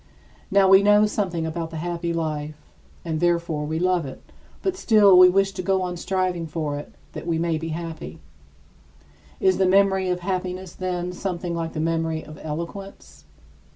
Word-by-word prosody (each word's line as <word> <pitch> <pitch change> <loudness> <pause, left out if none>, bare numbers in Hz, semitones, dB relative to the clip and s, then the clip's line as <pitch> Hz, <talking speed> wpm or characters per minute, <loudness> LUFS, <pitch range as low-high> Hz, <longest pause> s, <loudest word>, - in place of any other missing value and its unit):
Now 195 0 +4
we 195 +1 +7
know 205 +1 +5
something 185 -6 -2
about 165 0 -4
the 165 - -7
happy 170 +1 -3
life 155 -2 -3 0.5
and 160 -2 -2
therefore 170 -3 0
we 155 +2 -2
love 180 0 +1
it, 135 -2 -8 0.4
but 380 -1 0
still 210 - +5
we 180 0 +9
wish 195 +1 +2
to 190 - -5
go 190 0 +1
on 180 -1 -3
striving 180 -1 -1
for 150 -2 -3
it 145 - -11 0.2
that - - -8
we 165 -1 +1
may 165 -1 0
be 165 - -5
happy. 165 0 -6 1.2
Is 380 -1 +2
the 190 - +4
memory 190 0 +3
of 180 0 -1
happiness, 185 -1 -3
then, 180 -1 -3
something 180 -2 -4
like 165 -1 -3
the 155 - -4
memory 160 0 -1
of 155 0 -11
eloquence? 160 - -7
175 Hz, 175 wpm, -23 LUFS, 160-190 Hz, 1.2 s, we